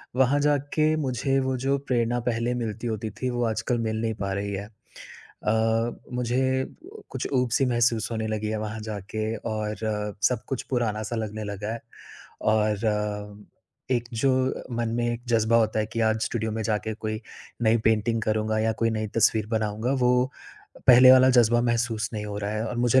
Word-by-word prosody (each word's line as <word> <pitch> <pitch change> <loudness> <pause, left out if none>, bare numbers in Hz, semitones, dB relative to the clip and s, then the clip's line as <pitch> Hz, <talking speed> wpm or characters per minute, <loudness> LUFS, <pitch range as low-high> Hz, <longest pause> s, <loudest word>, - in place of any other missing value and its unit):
वहाँ 135 +2 +3
जाके 150 +2 +2
मुझे 130 +2 0
वो 130 0 0
जो 140 +1 +2
प्रेरणा 120 -1 +1
पहले 115 +1 0
मिलती 120 -1 -3
होती 110 0 -3
थी, 125 +5 -4
वो 120 0 -1
आजकल 110 +2 -1
मिल 110 0 -2
नहीं 110 -1 0
पा 100 - -1
रही 100 +1 -2
है। 100 +1 -4
अ, 105 - -15 1.5
मुझे 130 +2 +1
अ, 395 - -11
कुछ - - -3
ऊब-सी 125 0 +2
महसूस 120 -1 +2
होने 110 -1 -2
लगी 110 0 -2
है 110 - -1
वहाँ 110 +1 -5
जाके 110 +2 -3 0.2
और 105 0 -3 0.5
सब 125 -3 -3
कुछ 135 - -2
पुराना-सा 115 -2 -1
लगने 110 -1 -4
लगा 105 +1 -4
है। 115 - -5 0.6
और 105 -1 0 0.5
एक 120 -2 +1 0.2
जो 135 - +4 0.5
मन 120 -1 0
में 120 - 0
एक 120 - -6
जज़्बा 115 0 +3
होता 110 -1 +2
है 105 - -1
कि 115 - -2
आज 110 0 -1
स्टूडियो 110 -1 -2
में 110 0 -2
जाके 110 +1 -1
कोई 110 0 -4 0.4
नई 110 0 +4
पेंटिंग 110 +1 +2
करूँगा 110 0 0
या 110 +1 +2
कोई 115 - +3
नई 110 -1 -2
तस्वीर 110 -2 +3
बनाऊँगा, 110 +1 -1
वो 125 0 +2 0.6
पहले 125 +1 +9
वाला 130 0 +7
जज़्बा 120 -1 +5
महसूस 115 -3 0
नहीं 105 -1 -4
हो 105 -1 -5
रहा 100 0 -3
है 110 +1 -2
और 120 - -4
मुझे 120 +2 +4
115 Hz, 180 wpm, -26 LUFS, 110-125 Hz, 1.5 s, पहले